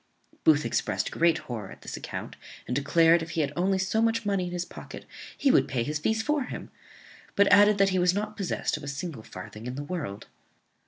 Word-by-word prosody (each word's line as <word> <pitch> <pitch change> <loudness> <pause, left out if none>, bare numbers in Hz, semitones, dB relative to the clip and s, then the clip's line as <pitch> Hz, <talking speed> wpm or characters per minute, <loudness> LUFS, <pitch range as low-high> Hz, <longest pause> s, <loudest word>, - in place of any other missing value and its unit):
Booth 150 -2 +5
exprest 105 -4 -1
great 170 0 +3
horror 110 -6 -6
at - - -13
this - - -6
account, - - -6 0.3
and 125 - -3
declared, 165 +4 +4
if 165 - -6
he - - +3
had 145 -1 -1
only 190 +2 +1
so 190 +4 0
much 230 0 +1
money 195 -3 0
in - - -6
his 175 0 -3
pocket, - - -10 0.3
he 280 - +3
would - - +4
pay 130 -3 -1
his 150 +3 -2
fees 220 +8 0
for 295 -1 0
him; - - -7 0.6
but 200 - +5
added 205 +1 +7
that 195 0 +4
he 185 -1 +1
was 180 0 +4
not 210 +1 -3
possessed 195 -5 -2
of 150 - -11
a - - -7
single 140 -2 -5
farthing 105 +3 -9
in 125 - -4
the 145 - -4
world. 145 - -5
170 Hz, 220 wpm, -27 LUFS, 140-200 Hz, 0.6 s, added